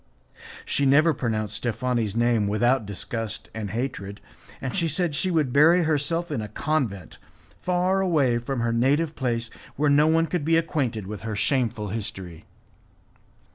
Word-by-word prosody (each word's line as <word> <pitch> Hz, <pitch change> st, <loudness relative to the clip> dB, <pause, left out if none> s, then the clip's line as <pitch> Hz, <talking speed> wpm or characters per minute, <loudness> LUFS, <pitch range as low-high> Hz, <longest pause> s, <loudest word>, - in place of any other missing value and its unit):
She 140 Hz, -, +1 dB
never 155 Hz, +4 st, +5 dB
pronounced 110 Hz, -5 st, -2 dB
Steffani's 115 Hz, -2 st, -1 dB
name 115 Hz, -3 st, +2 dB
without 120 Hz, +2 st, +1 dB
disgust 110 Hz, +2 st, -5 dB
and 110 Hz, -2 st, -4 dB
hatred, 105 Hz, -3 st, -4 dB, 0.4 s
and 130 Hz, -, -4 dB
she 170 Hz, -4 st, +1 dB
said 160 Hz, +1 st, -1 dB
she 170 Hz, +6 st, -1 dB
would 155 Hz, -8 st, +1 dB
bury 165 Hz, +5 st, +6 dB
herself 160 Hz, +2 st, 0 dB
in 130 Hz, -7 st, -1 dB
a 105 Hz, -, -5 dB
convent, 115 Hz, -4 st, -2 dB, 0.4 s
far 180 Hz, +1 st, +1 dB
away 145 Hz, -10 st, +2 dB
from 120 Hz, +1 st, -3 dB
her 115 Hz, 0 st, 0 dB
native 145 Hz, +7 st, +2 dB
place, 115 Hz, -3 st, -2 dB, 0.2 s
where 145 Hz, +1 st, +2 dB
no 150 Hz, +2 st, +5 dB
one 165 Hz, +1 st, +3 dB
could 170 Hz, -2 st, -2 dB
be 165 Hz, +2 st, +3 dB
acquainted 135 Hz, -, -1 dB
with 105 Hz, +1 st, -7 dB
her 110 Hz, -1 st, -4 dB
shameful 110 Hz, 0 st, 0 dB
history. 95 Hz, -5 st, -6 dB
125 Hz, 155 wpm, -25 LUFS, 110-155 Hz, 0.4 s, bury